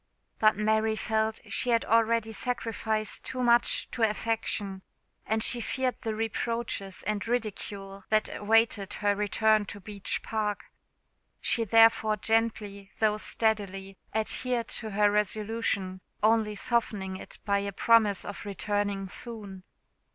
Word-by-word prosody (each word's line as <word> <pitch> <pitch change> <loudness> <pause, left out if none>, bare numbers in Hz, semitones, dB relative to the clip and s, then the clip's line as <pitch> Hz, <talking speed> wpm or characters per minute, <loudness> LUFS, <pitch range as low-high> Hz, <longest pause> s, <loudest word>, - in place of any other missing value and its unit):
But 215 -1 +4
Mary 220 +1 +1
felt 220 0 -1
she 225 +3 0
had 230 -1 +2
already 230 0 +2
sacrificed 220 -2 -2
too 255 -1 -3
much 240 0 +4
to 240 - -5
affection, 215 -3 -1 0.5
and 220 0 +1
she 240 0 +2
feared 255 +1 -1
the 220 -3 -3
reproaches 225 -2 -3
and 210 +1 -2
ridicule 200 -4 -4
that 215 0 +2
awaited 210 -1 +2
her 205 -1 +1
return 215 +1 +2
to 205 - -8
Beech 200 0 -1
Park. 210 -2 -3 0.7
She 230 - +2
therefore 225 -1 +5
gently, 210 -2 -1
though 215 -1 +2
steadily, 200 -3 -1 0.2
adhered 235 +2 -2
to 220 - -2
her 205 0 +3
resolution, 210 -2 -1 0.2
only 215 -1 +3
softening 205 -4 -1
it - - -11
by 200 -1 +2
a 200 0 -3
promise 210 -1 +3
of 205 - -7
returning 205 -1 -2
soon. 205 -2 -6
215 Hz, 130 wpm, -28 LUFS, 205-225 Hz, 0.7 s, therefore